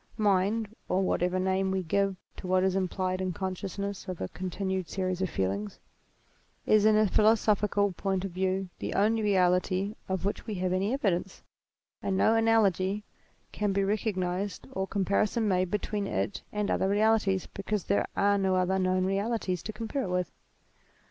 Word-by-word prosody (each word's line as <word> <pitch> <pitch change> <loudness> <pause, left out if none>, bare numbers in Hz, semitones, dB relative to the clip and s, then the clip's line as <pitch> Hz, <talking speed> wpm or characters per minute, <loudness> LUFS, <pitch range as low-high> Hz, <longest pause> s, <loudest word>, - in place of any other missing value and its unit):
Mind, 210 +1 +1 0.2
(or 190 +1 +2
whatever 180 0 +1
name 190 +1 +1
we 190 0 -1
give 195 +3 +1 0.2
to - - -7
what 185 0 +3
is 190 0 +2
implied 185 0 -1
in 185 -1 -1
con 190 +2 -3
sciousness 200 +2 -5
of 185 -2 -5
a 95 - -3
continued 185 -1 -3
series 185 0 -2
of 185 - 0
feelings) 100 0 -2 0.9
is 215 -1 +4
in 215 0 +5
a 215 - +5
philosophical 210 -1 +3
point 190 +1 -2
of 195 - -4
view 190 +1 -1
the - - -4
only 220 +3 +3
reality 185 0 +2 0.2
of 190 -1 -2
which 205 - -2
we 215 - -3
have 185 0 -1
any 195 +4 0
evidence; 195 -8 -1 0.6
and 190 -1 -1
no 220 - +4
analogy 210 -3 +2 0.5
can 205 -2 -1
be 200 - +1
recog 210 +1 0
nized 185 +1 -2
or 190 0 -2
comparison 205 +3 +1
made 185 -2 +1
between 210 0 -2
it 200 - -2
and 210 -1 -1
other 190 - +1
realities 205 -2 +2
because 200 0 -2
there 200 - +1
are 200 0 +3
no 190 -1 +2
other 185 +1 +1
known 185 0 +1
realities 195 -2 -1
to - - -5
compare 225 +5 -3
it - - -4
with. 180 -1 -1
195 Hz, 175 wpm, -29 LUFS, 185-205 Hz, 0.9 s, in